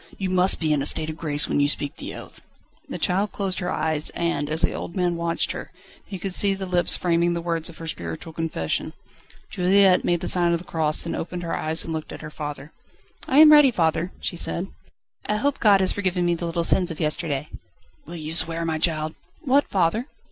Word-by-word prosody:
You 190 -2 -3
must 185 +1 +4
be 155 -2 +1
in 145 - 0
a 140 - +3
state 160 0 +1
of 155 - -10
grace 150 -3 +1
when - - 0
you 145 - +3
speak 145 +1 -2
the - - -7
oath." - - -12 0.5
The - - -4
child 195 +3 +1
closed 195 -2 -2
her 180 - -3
eyes, 155 -1 0
and 170 -4 -1
as 160 +2 -1
the - - +2
old 170 - -6
man 180 -2 0
watched 170 0 -1
her, - - -7 0.4
he 195 - -6
could 190 +1 -4
see 195 +1 +3
the 195 0 -5
lips 180 -1 +2
framing 170 0 +1
the - - -2
words 165 -1 -2
of 170 - -12
her 165 - -8
spiritual 85 - -6
confession. 155 - -3 0.6
Juliette 190 +1 +4
made 175 -1 0
the - - -3
sign 175 -1 +3
of - - +2
the 180 - -12
cross, 155 -2 0
then 170 - -4
opened 175 +1 -5
her 165 - -3
eyes 160 +1 0
and 165 - -5
looked 155 -1 -5
at - - -9
her 150 -1 -8
father. 150 -1 -7 0.6
"I 265 - +1
am 310 -1 +9
ready, 295 -2 +8
father," 170 -4 0
she - - -4
said; 175 +2 -3 0.6
"I 210 - 0
hope 280 +6 -1
God 205 -3 +5
has 190 - +3
forgiven 185 -3 -1
me 175 - +2
the 170 0 -4
little 170 0 -1
sins 180 +2 +2
of 165 - -7
yesterday." 150 -2 -2 0.6
"Will 170 - -8
you 155 -1 -5
swear, 165 0 +2
my 160 -1 -2
child?" 155 -1 0 0.3
"What, 280 -1 +2
father?" 195 - 0
170 Hz, 225 wpm, -23 LUFS, 160-185 Hz, 0.6 s, am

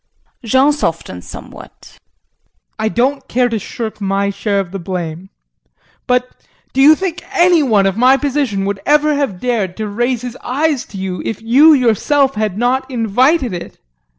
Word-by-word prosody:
JEAN 260 +6 +3
[Softens 160 - -4
somewhat]. - - -12 0.8
I 220 0 0
don't 265 +4 -1
care 250 0 +1
to 225 -2 -2
shirk 220 +1 -6
my 200 0 0
share 200 0 -1
of 185 -3 -4
the 195 - -5
blame, 175 0 -5 0.8
but 250 0 -1 0.3
do 270 - +2
you 300 +3 +8
think 360 0 -4
any 350 -3 +4
one 215 -8 +2
of 195 +1 0
my 255 +3 +5
position 270 -8 -1
would 200 0 -2
ever 300 +1 +3
have 275 -11 -2
dared 215 -7 -2
to 215 -1 -3
raise 240 +3 -1
his 245 -1 -6
eyes 285 +1 -1
to 200 - -11
you 190 -1 -4
if 225 - -4
you 280 +8 +6
yourself 270 +2 +2
had 210 -3 -2
not 250 +4 0
invited 250 - +1
it? 175 - -7
240 Hz, 165 wpm, -16 LUFS, 200-275 Hz, 0.8 s, you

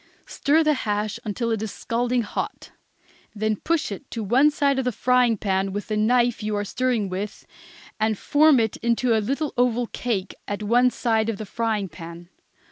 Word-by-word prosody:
Stir 310 +3 +2
the 305 -1 +3
hash 210 -3 -2
until 230 +2 -2
it 220 -2 -1
is 220 -2 -3
scalding 240 +1 -1
hot; 205 - -5 0.6
then 215 +1 0
push 330 +3 -1
it 205 +7 -8
to 225 - -4
one 255 +9 +4
side 280 -2 +1
of 265 - -1
the 250 - +1
frying 250 0 +2
pan 195 -1 -1
with 205 +2 -5
the 215 - 0
knife 240 +2 +2
you 210 0 -2
are 205 0 -1
stirring 245 -1 0
it - - -5
with, 195 +3 -5 0.5
and 215 -1 +1
form 295 +2 +4
it 220 -2 0
into 235 0 +1
a 220 - +2
little 275 +7 -2
oval 245 -1 +2
cake 215 -5 -3
at 205 +1 -4
one 240 +4 +4
side 225 -3 0
of 220 - -2
the 215 - -6
frying 220 -1 -1
pan. 170 +1 -10
225 Hz, 195 wpm, -24 LUFS, 210-250 Hz, 0.6 s, one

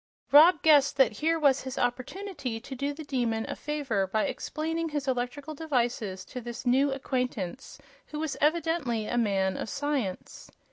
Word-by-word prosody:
Rob 315 +3 +7
guessed 290 -4 +5
that 240 -6 +4
here 325 +2 +2
was 280 -4 +3
his 260 0 -6
opportunity 255 - -3
to 255 +4 -9
do 280 +2 -2
the 305 +2 -8
Demon 235 -6 -1
a - - -4
favor 275 -10 -1
by 215 +3 0
explaining 325 +1 -3
his 290 -2 -3
electrical 260 +4 -2
devices 240 -10 -2
to 250 - -7
this 235 +1 -7
new 270 +3 +3
acquaintance, 255 -5 -3 0.3
who 300 - -7
was 310 -2 -2
evidently 300 -7 +1
a - - -3
man 195 -4 +1
of - - -4
science. 280 -10 -3
270 Hz, 160 wpm, -28 LUFS, 235-300 Hz, 0.3 s, Rob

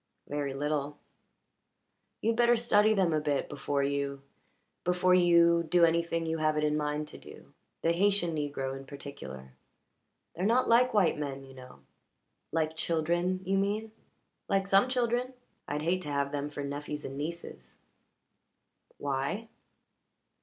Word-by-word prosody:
"Very 145 -2 -3
little." 145 0 -2 1.2
"You'd 225 +1 +1
better 240 0 +4
study 215 -2 +4
them 185 -5 +2
a 155 - +1
bit 145 -2 0
before 140 -1 -2
you 140 0 -2 0.6
before 180 +1 +3
you 170 -1 +5
do 175 0 +6
anything 165 0 0
you 160 0 -2
have 155 0 +1
it 150 - +1
in 150 0 +2
mind 150 0 -2
to - - -11
do - - -14 0.3
the 165 - +3
Haytian 195 -2 +2
negro 145 -3 -3
in 135 0 -10
particular. 65 - -9 0.8
They're 175 - -4
not 245 +3 +3
like 240 +1 +4
white 185 -7 +3
men, 135 -2 -4
you 135 0 -13
know." 130 -1 -13 0.7
"Like 160 -1 0
children, 170 +3 0
you 195 +1 +1
mean?" 210 +3 -1 0.6
"Like 195 0 +2
some 195 +5 +4
children. 250 0 0 0.3
I'd 150 +1 -3
hate 180 +3 +1
to 150 - -6
have 140 0 0
them 145 0 -3
for 145 -1 -6
nephews 145 +1 -5
and 135 - -6
nieces." 165 +4 -6 1.2
"Why?" 145 +11 -2
160 Hz, 145 wpm, -30 LUFS, 145-190 Hz, 1.2 s, do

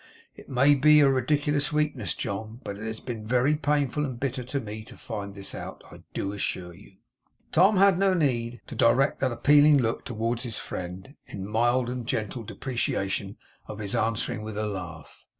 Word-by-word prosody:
It - - -14
may 135 +3 +5
be 150 +2 +6
a 140 - +6
ridiculous 145 +2 +1
weakness, 150 0 0
John, 110 0 -4
but 100 - -5
it 105 +2 -7
has 110 0 -4
been 115 -4 -6
very 125 +6 +2
painful 150 -1 0
and 130 -5 -4
bitter 130 -1 -2
to 140 +3 -2
me 110 -2 -7
to - - -13
find 100 -3 -6
this 100 -1 -4
out, - - -8
I - - -12
do 100 - -2
assure 90 -3 -3
you.' 100 +2 -16 0.6
Tom 190 +5 +5
had 195 -1 +5
no 195 -1 +3
need 120 -7 0
to - - -9
direct 135 +4 +3
that 130 -2 +1
appealing 145 +4 +6
look 115 -4 0
towards 115 +1 -2
his 120 -4 -3
friend, 90 +7 -6
in 95 -1 -6
mild 120 +3 +2
and 125 -1 -4
gentle 110 +2 -2
deprecation 100 -4 -2 0.3
of 105 - -7
his 105 -2 -4
answering 110 -1 0
with 110 -1 -6
a 110 - -1
laugh. 90 -6 -7
120 Hz, 185 wpm, -27 LUFS, 105-140 Hz, 0.6 s, be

